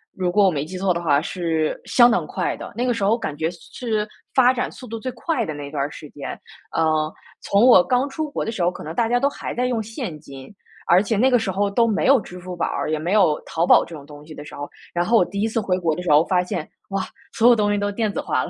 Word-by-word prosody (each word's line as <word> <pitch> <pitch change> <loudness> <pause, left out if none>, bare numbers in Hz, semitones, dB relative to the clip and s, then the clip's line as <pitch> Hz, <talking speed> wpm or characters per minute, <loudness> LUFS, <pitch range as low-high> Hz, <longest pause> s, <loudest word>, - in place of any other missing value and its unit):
如 180 -2 -1
果 205 +1 +4
我 185 - +4
没 145 -2 -2
记 180 +4 -7
错 185 -1 +1
的 170 - -3
话 145 -4 +3
是 165 -3 -2
相 240 -1 +6
当 235 - +1
快 - - -2
的。 - - -9
那 245 +2 -1
个 245 - +2
时 205 - -3
候 220 +4 +3
感 150 -10 -4
觉 160 +2 -1
是 170 - -14
是 215 -4 -2 0.3
发 255 -1 +6
展 250 - -2
速 255 - -11
度 225 0 -6
最 255 +2 -4
快 315 -9 -1
的 155 - -4
那 145 -1 -7
段 145 -2 -2
儿 145 - -2
时 150 - -10
间。 145 - -7 0.3
呃， 155 -1 +1 0.3
从 200 +4 +3
我 185 -8 +8
刚 255 +2 +1
出 305 +2 -4
国 - - -3
的 225 - -2
时 190 -6 -2
候， 175 - +2
可 - - -10
能 160 +2 -6
大 230 -1 +1
家 245 - +2
都 275 - +2
还 - - -6
在 250 +1 0
用 240 -3 0
现 220 - -6
金， 135 +4 -12 0.3
而 180 +2 +6
且 215 0 -1
那 260 +5 +4
个 245 - +4
时 195 -4 -2
候 200 +2 0
都 230 +4 +3
没 210 - 0
有 270 0 +6
支 180 +1 -10
付 180 0 -7
宝 170 - -1
儿， - - -2
也 155 - 0
没 170 +4 -3
有 180 -8 +4
淘 165 +1 0
宝 - - +7
这 170 - -12
种 140 -2 -11
东 145 0 -13
西 155 - -11
的 145 - -9
时 - - -10
候。 145 - -6 0.3
然 175 0 0
后 230 +3 +4
我 180 - +5
第 200 +3 -4
一 220 - +2
次 225 - -1
回 185 -2 0
国 165 -3 +1
的 180 - -5
时 180 - -3
候 150 +3 +6
发 180 -1 +2
现， 170 -3 -4 0.2
哇， 195 -1 -1 0.3
所 230 - +4
有 240 - +7
东 205 -1 +1
西 205 - +1
都 205 0 -1
电 215 0 -1
子 - - -3
化 - - 0
了。 - - -6
195 Hz, 325 characters per minute, -22 LUFS, 160-230 Hz, 0.3 s, 我